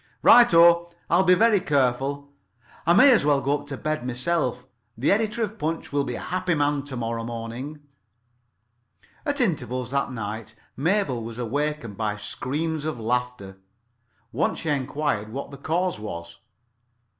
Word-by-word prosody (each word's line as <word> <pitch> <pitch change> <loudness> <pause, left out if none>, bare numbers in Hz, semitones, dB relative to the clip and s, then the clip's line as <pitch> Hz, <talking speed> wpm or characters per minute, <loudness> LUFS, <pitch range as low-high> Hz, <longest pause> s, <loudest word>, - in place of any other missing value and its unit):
"Right 240 0 +8
o. 170 0 +6 0.2
I'll 170 +2 +5
be 180 -1 +5
very 220 +1 +4
careful. 140 -3 0 0.6
I 170 - +6
may 260 +8 +7
as 240 - +4
well 145 -1 +3
come 140 +2 0
[Pg - - -11
8]up 145 - -14
to 135 - -5
bed 155 -4 -3
myself. 125 -1 -1 0.3
The 130 +6 +2
editor 220 +3 +1
of 215 +1 -5
Punch 160 +2 -3
will 145 -1 +2
be 125 -3 -4
a - - -5
happy 185 -1 -1
man 145 -1 +1
to 135 -3 -6
morrow 115 -1 -3
morning." 120 +6 -6 1.5
At 285 0 0
intervals 130 - -1
that 140 -1 0
night 110 -1 -6 0.2
Mabel 155 - 0
was 115 0 -7
awakened 135 -2 -3
by 105 -2 -2
screams 150 +8 -3
of 155 -5 -3
laughter. 115 -4 -3 0.7
Once - - 0
she 160 - -3
enquired 140 -6 -1
what 140 +3 -6
the 140 - -9
cause 170 - -1
was. 85 -5 -7
140 Hz, 160 wpm, -24 LUFS, 120-165 Hz, 1.5 s, Right